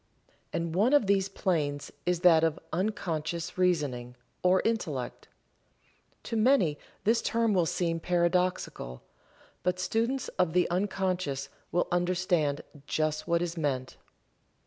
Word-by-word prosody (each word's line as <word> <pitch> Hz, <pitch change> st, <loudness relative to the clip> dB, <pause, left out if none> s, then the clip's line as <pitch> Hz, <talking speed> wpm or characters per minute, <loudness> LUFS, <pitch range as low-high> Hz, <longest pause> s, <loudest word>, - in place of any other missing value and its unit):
And 165 Hz, -1 st, -2 dB
one 215 Hz, -, +3 dB
of 290 Hz, -7 st, +5 dB
these 195 Hz, -1 st, +2 dB
planes 150 Hz, -8 st, -1 dB, 0.2 s
is 180 Hz, -1 st, +1 dB
that 165 Hz, -3 st, +6 dB
of 160 Hz, -1 st, +1 dB
Unconscious 170 Hz, -4 st, -2 dB
Reasoning, 145 Hz, -10 st, 0 dB, 0.3 s
or 185 Hz, +1 st, +4 dB
Intellect. 155 Hz, -, -2 dB, 1.0 s
To -, -, -4 dB
many 215 Hz, -, +3 dB, 0.2 s
this 230 Hz, +2 st, +3 dB
term 230 Hz, -2 st, +1 dB
will 175 Hz, -3 st, +3 dB
seem 165 Hz, -1 st, 0 dB
paradoxical, 175 Hz, -, 0 dB, 0.6 s
but 180 Hz, 0 st, 0 dB
students 230 Hz, +7 st, 0 dB
of 180 Hz, -3 st, +2 dB
the 180 Hz, -1 st, +3 dB
unconscious 180 Hz, -7 st, -1 dB, 0.2 s
will 175 Hz, -, +1 dB
understand 175 Hz, -4 st, +1 dB, 0.3 s
just 155 Hz, 0 st, -1 dB
what 170 Hz, 0 st, +2 dB
is 170 Hz, -1 st, -3 dB
meant. 135 Hz, -5 st, -2 dB
175 Hz, 125 wpm, -29 LUFS, 155-190 Hz, 1.0 s, that